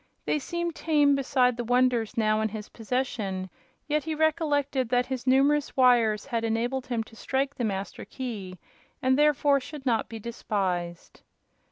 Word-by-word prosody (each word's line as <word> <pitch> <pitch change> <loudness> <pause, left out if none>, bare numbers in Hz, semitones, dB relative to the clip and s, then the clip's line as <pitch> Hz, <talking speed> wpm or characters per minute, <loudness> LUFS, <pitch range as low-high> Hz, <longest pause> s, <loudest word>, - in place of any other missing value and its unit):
They 300 - +1
seemed 345 +3 -3
tame 295 -3 +3
beside 255 -3 +2
the 240 - -2
wonders 245 -1 +1
now 215 -1 +2
in 220 - 0
his 210 0 -7
possession; 215 -6 -3 0.4
yet 300 0 0
he 320 -1 -2
recollected 290 -5 +1
that 250 0 +2
his 260 -1 -5
numerous 280 +3 +3
wires 240 -5 +4
had 235 -4 -2
enabled 240 +4 -1
him 235 -3 -1
to 225 - -17
strike 270 +4 -1
the 245 - -4
Master 195 -3 -3
Key, 210 -8 -6 0.5
and 260 0 +4
therefore 290 -1 +3
should 285 +1 -9
not 230 -4 +1
be 225 - -6
despised. 190 -6 -3
250 Hz, 160 wpm, -27 LUFS, 220-280 Hz, 0.5 s, wires